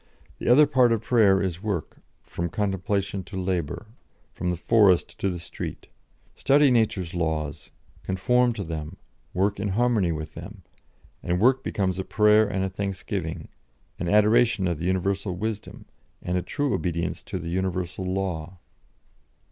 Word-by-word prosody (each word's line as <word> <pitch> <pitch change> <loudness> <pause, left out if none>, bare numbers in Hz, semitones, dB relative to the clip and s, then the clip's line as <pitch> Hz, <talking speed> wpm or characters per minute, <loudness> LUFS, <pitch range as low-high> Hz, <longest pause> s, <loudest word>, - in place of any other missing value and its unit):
The - - -5
other 140 +5 +7
part 130 -4 +3
of 115 -1 0
prayer 100 -6 +4
is 90 -2 -3
work; 100 -7 -4 0.2
from 85 0 -4
contemplation 100 +1 -1
to 95 - -8
labour, 90 0 -2 0.5
from 90 - -3
the 90 - 0
forest 95 0 +3
to 100 - 0
the 90 - -3
street. 85 - -7 0.5
Study 140 0 +4
nature's 110 -7 +1
laws, 80 -3 -2 0.3
conform 125 +7 +2
to 105 -3 -4
them, 80 +1 -6 0.3
work 100 +2 0
in 105 - -1
harmony 105 -3 +2
with 80 -1 -5
them, - - -10 0.6
and 90 +1 -1
work 130 +5 +3
becomes 95 -2 -1
a - - -1
prayer 105 +1 +4
and 95 -1 -1
a - - 0
thanksgiving, 95 -4 -4 0.5
an 85 - -2
adoration 105 -1 +4
of 85 -4 -2
the 85 - -3
universal 95 +1 -1
wisdom, 105 +2 -5 0.4
and 90 - -2
a 90 - +1
true 145 - -2
obedience 85 -2 -2
to - - -5
the 85 -2 -5
universal 90 0 -2
law." 95 -2 -3
95 Hz, 155 wpm, -25 LUFS, 90-105 Hz, 0.6 s, other